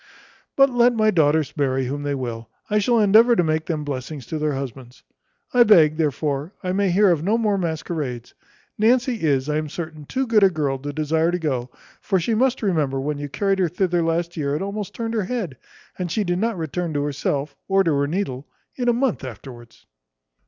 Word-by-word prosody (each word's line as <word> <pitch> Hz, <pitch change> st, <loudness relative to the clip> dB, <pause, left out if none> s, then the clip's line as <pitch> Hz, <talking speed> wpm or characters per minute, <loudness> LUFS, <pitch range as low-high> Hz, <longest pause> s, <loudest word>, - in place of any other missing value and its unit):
But 275 Hz, -1 st, +5 dB
let 245 Hz, 0 st, +4 dB
my 215 Hz, -1 st, +3 dB
daughters 155 Hz, -3 st, +2 dB
marry 135 Hz, -2 st, 0 dB
whom 140 Hz, +3 st, -4 dB
they 145 Hz, -1 st, -2 dB
will, 115 Hz, -3 st, -5 dB, 0.2 s
I 210 Hz, -, +3 dB
shall 235 Hz, +3 st, +2 dB
endeavour 220 Hz, +4 st, +6 dB
to 180 Hz, -, +3 dB
make 155 Hz, 0 st, -1 dB
them 155 Hz, -3 st, -2 dB
blessings 140 Hz, -1 st, -5 dB
to 155 Hz, -, -4 dB
their 150 Hz, -1 st, 0 dB
husbands: 130 Hz, -1 st, -7 dB, 0.5 s
I 250 Hz, -, +5 dB
beg, 165 Hz, -9 st, +6 dB
therefore, 150 Hz, +1 st, -1 dB
I 180 Hz, -, -1 dB
may 195 Hz, +1 st, +1 dB
hear 195 Hz, +2 st, +4 dB
of 165 Hz, -4 st, +1 dB
no 210 Hz, +5 st, +2 dB
more 215 Hz, -3 st, +1 dB
masquerades. 160 Hz, -8 st, -4 dB, 0.5 s
Nancy 240 Hz, +1 st, +2 dB
is, 140 Hz, -3 st, +1 dB
I 150 Hz, 0 st, 0 dB
am 155 Hz, -1 st, -3 dB
certain, 155 Hz, -2 st, -7 dB
too 265 Hz, -, -2 dB
good 225 Hz, -3 st, +3 dB
a 195 Hz, -, +6 dB
girl 145 Hz, -6 st, -2 dB
to 145 Hz, +2 st, -5 dB
desire 160 Hz, +2 st, 0 dB
to 175 Hz, -, 0 dB
go; 130 Hz, -7 st, -2 dB, 0.3 s
for 190 Hz, -2 st, +1 dB
she 200 Hz, +7 st, -1 dB
must 255 Hz, +2 st, +1 dB
remember 150 Hz, -9 st, 0 dB
when 145 Hz, +2 st, -3 dB
you 145 Hz, 0 st, -5 dB
carried 195 Hz, +5 st, 0 dB
her 180 Hz, -3 st, +2 dB
thither 175 Hz, 0 st, 0 dB
last 165 Hz, +1 st, -1 dB
year, 145 Hz, -2 st, -1 dB
it 155 Hz, -, -2 dB
almost 200 Hz, 0 st, -5 dB
turned 230 Hz, -1 st, -3 dB
her 215 Hz, -4 st, 0 dB
head; 205 Hz, -, -3 dB, 0.4 s
and 180 Hz, -2 st, -3 dB
she 215 Hz, -, 0 dB
did 175 Hz, -1 st, -1 dB
not 225 Hz, -1 st, -1 dB
return 165 Hz, 0 st, -3 dB
to 145 Hz, -, 0 dB
herself, 145 Hz, 0 st, -2 dB
or 195 Hz, 0 st, +3 dB
to 165 Hz, -4 st, +1 dB
her 140 Hz, 0 st, +1 dB
needle, 145 Hz, -6 st, -3 dB, 0.3 s
in 245 Hz, -2 st, 0 dB
a -, -, +4 dB
month 245 Hz, -, 0 dB
afterwards." 120 Hz, -1 st, -11 dB
165 Hz, 210 wpm, -22 LUFS, 145-205 Hz, 0.5 s, endeavour